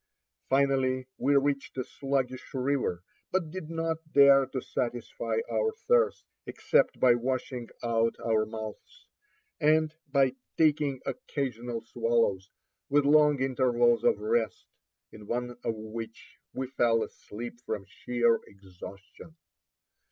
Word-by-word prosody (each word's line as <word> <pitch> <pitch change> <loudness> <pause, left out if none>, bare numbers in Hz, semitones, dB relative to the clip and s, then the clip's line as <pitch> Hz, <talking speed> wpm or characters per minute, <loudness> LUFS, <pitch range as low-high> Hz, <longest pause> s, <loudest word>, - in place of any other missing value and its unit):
Finally 130 -1 +2
we 140 +2 +2
reached 140 -1 0
a 130 - 0
sluggish 130 -1 -3
river, 130 -9 -1 0.3
but 175 -5 -1
did 175 -4 -7
not 165 0 -1 0.2
dare 140 -1 +7
to 130 0 -3
satisfy 120 - -3
our 450 -3 0 0.2
thirst, 480 0 +3 0.2
except - - +1
by 125 -2 +6
washing 125 0 -3
out 115 -1 +1
our 110 -2 +3
mouths, 110 -1 -8 0.5
and 155 +1 +3 0.2
by 135 -2 +3 0.2
taking 150 -4 +2
occasional 120 - -4
swallows, 115 -5 0 0.4
with 145 0 +3
long 150 -1 +5
intervals 120 -3 +2
of - - +4
rest, 110 0 -1 0.5
in 105 -1 -12
one 125 +1 -2
of 115 - -1
which 110 +1 -9
we 130 - -3
fell 120 -3 +2
asleep 120 +3 -9
from 105 -3 -4
sheer 120 +2 +1
exhaustion. 100 - -13
125 Hz, 120 wpm, -29 LUFS, 115-140 Hz, 0.5 s, dare